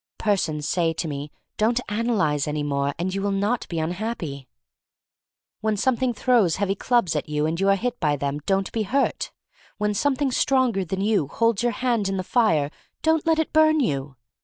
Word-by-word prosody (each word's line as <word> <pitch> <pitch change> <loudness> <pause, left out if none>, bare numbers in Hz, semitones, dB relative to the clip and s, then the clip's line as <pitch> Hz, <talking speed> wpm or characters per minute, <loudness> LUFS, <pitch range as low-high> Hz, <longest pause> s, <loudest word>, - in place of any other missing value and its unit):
Persons 160 -8 0
say 165 -2 +1
to 165 +1 -3
me, 145 0 -5 0.3
don't 230 +3 +2
analyze 210 -10 0
any 150 0 -2
more 140 -1 -1
and 180 +3 -2
you 195 - -2
will 200 - 0
not 200 +4 0
be 170 - -4
unhappy. 165 - -3 1.1
When 215 0 0
Something 255 +3 +1
throws 230 -7 +2
heavy 195 -1 0
clubs 235 -3 +1
at - - -2
you 150 0 0
and 160 +2 -1
you 195 0 +2
are 195 - +5
hit 245 +4 -3
by 150 -3 +2
them, 140 +1 -2
don't 195 0 +1
be 225 - -1
hurt. 265 +7 0 0.5
When 210 0 0
Something 280 +4 +1
stronger 250 -6 +2
than 190 +2 -3
you 200 -7 +2
holds 230 - +1
your 240 0 +1
hands 230 -4 0
in 195 - -1
the 185 - -2
fire, 165 - +2 0.3
don't 320 0 +2
let 325 -1 +4
it 320 - -1
burn 315 0 +5
you. 140 - -1
195 Hz, 190 wpm, -24 LUFS, 160-240 Hz, 1.1 s, are